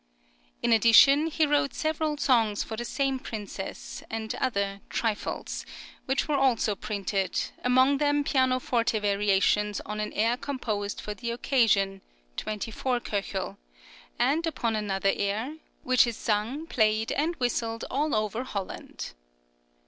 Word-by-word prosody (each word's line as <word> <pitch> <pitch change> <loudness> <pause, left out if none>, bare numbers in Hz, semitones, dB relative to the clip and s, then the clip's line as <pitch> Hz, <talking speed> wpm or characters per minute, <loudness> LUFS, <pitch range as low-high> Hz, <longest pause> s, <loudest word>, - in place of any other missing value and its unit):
In 235 - +4
addition, 255 +7 +7
he 320 0 +2
wrote 290 -2 +1
several 310 -1 -1
songs 225 -7 +2
for 220 - -6
the 235 - -4
same 270 +1 -1
princess, 205 -5 -6
and 220 +1 -3
other 200 -5 -1
"trifles," 220 -3 -2 0.4
which 265 0 0
were 295 -2 +1
also 250 -5 +2
printed, 195 -2 -2 0.2
among 260 +3 +4
them 290 0 +2
pianoforte 255 -4 +1
variations 205 0 +2
on 210 +1 -5
an 210 0 -2
air 230 +3 +2
composed 220 -8 -3
for 210 - -5
the 235 +3 -5
occasion 225 -6 +2 0.4
(24 225 +4 -2
K.), 195 -3 -3 0.6
and 290 +7 +2
upon 235 -7 -1
another 195 -2 +1
air, 220 +9 -2 0.3
"which 255 -1 +4
is 235 - -3
sung, 225 +8 -1
played, 220 -6 +1
and 320 +4 0
whistled 230 -3 -1
all 290 +1 +1
over 215 +3 -1
Holland." 200 - -6
230 Hz, 130 wpm, -27 LUFS, 210-265 Hz, 0.6 s, addition